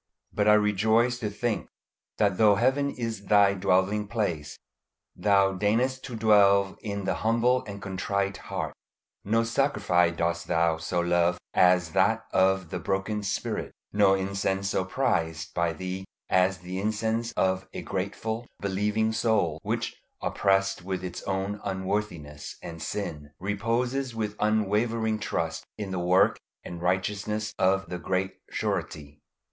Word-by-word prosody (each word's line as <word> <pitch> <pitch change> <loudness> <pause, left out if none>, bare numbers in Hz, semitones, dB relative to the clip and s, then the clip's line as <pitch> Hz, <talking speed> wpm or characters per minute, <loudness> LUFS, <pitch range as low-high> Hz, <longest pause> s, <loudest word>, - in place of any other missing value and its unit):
But - - +1
I 105 - +8
rejoice 110 +4 +2
to 110 -4 -2
think 110 +2 -2 0.5
that 100 -3 +2
though 105 -2 +6
Heaven 135 +6 +2
is 115 -6 -4
Thy 100 -2 +5
dwelling 100 +2 +1
place 90 -10 -2 0.6
Thou 100 -1 +3
deignest 115 +7 +1
to 125 - -6
dwell 100 -3 +4
in 100 -2 -4
the - - +1
humble 120 +3 +2
and 100 -1 -7
contrite 100 +1 -1
heart; - - -3 0.5
no 115 +3 +2
sacrifice 105 -9 +2
dost 85 0 -1
Thou 80 -1 +2
so 85 +2 -1
love 85 0 +2 0.2
as 90 -3 +4
that 110 +5 +2
of 95 -2 +2
the 90 - -3
broken 95 +4 -1
spirit; 100 - -3 0.2
no 100 -2 +5
incense 95 0 -1
so 95 - 0
prized 80 -3 -1
by 85 -1 +1
Thee 95 +2 -5 0.3
as 95 +1 +3
the 90 +1 -5
incense 110 +3 -1
of 95 0 0
a - - -6
grateful, 110 +4 -3
believing 105 +3 0
soul, 105 -9 +1
which, - - -3 0.2
oppressed 95 -1 +1
with 95 0 -3
its 90 -1 -5
own 100 +1 -2
unworthiness 95 -6 -3
and 80 -1 -7
sin, 75 -8 -4
reposes 115 +6 -1
with 105 -2 -2
unwavering 110 +1 +1
trust - - -2
in 105 -3 -5
the 95 - -2
work 90 +2 +3 0.2
and 85 -1 -7
righteousness 105 +3 -1
of 95 +1 +3
the 90 - -4
Great 95 +2 -2
Surety. 75 -1 -3
100 Hz, 140 wpm, -27 LUFS, 95-110 Hz, 0.6 s, I